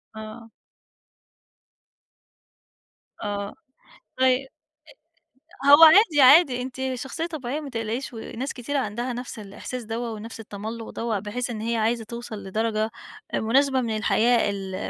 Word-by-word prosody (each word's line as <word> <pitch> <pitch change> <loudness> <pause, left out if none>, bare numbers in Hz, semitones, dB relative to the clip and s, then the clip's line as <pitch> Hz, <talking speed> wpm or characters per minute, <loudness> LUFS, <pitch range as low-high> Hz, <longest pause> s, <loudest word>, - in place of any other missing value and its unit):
آه. 220 +1 -9 2.7
آه، 200 -1 -3 0.7
طيب 260 +1 +3 1.2
أ - - +1
هو 290 +3 +9
عادي 320 -3 +7
عادي 260 -2 +7
أنتِ 255 0 -6 0.2
شخصيّة 270 +7 -4
طبيعيّة 295 -4 -4
ما 285 - -7
تقلقيش 230 +2 -4
وناس 235 +4 -5
كتير 280 +3 -3
عندها 240 +1 -2
نفس 245 -2 -7
الإحساس 215 +4 -7
دَوّة 230 +1 -4
ونفس 225 +1 -8
التملّق 220 +2 -7
دَوّة 225 -3 -2
بحيث 235 +5 -4
إن 215 -2 -5
هي 230 +1 -1
عايزة 225 +1 0
توصل 230 -2 -8
لدرجة 215 +2 -1 0.4
مناسبة 265 +3 +2
من 225 -2 -2
الحياة 230 +1 +2
ال 195 -2 -5
235 Hz, 125 wpm, -24 LUFS, 220-260 Hz, 2.7 s, هو